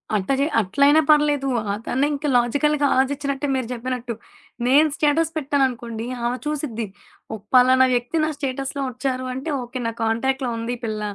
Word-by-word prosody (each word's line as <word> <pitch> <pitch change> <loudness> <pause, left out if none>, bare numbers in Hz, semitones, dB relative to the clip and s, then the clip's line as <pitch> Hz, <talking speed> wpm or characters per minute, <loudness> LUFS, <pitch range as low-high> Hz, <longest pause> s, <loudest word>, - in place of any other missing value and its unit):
అట్టా 200 +6 0
జే 280 - +3
అట్లయినా 280 +10 +4
పర్లేదు. 295 -2 +3 0.3
అదన్న 240 +5 -2
ఇంక 285 +1 -4
లాజికల్‌గా 285 +4 +2
ఆలోచించినట్టే 280 +1 0
మీరు 255 -3 -2
చెప్పినట్టు. 245 0 -4 0.5
నేను 295 +5 +5
స్టేటస్ 315 +2 +1
పెట్టాననుకోండి 250 -6 -1 0.2
ఆమె 245 +1 -1
చూసిద్ది. 280 -7 -3 0.5
ఓ - - -3 0.2
పలానా 255 +1 +6
వ్యక్తి 245 +6 -1
నా 310 - -1
స్టేటస్‌లో 275 0 -3
వచ్చారు 255 +1 -3
అంటే, 265 +5 -5
ఓకే. 250 +2 -6
నా - - -1
కాంటాక్ట్‌లో 255 +3 0
ఉంది 230 +2 -3
ఈ - - -26
పిల్ల. 215 -1 -3
260 Hz, 150 wpm, -22 LUFS, 240-285 Hz, 0.5 s, పలానా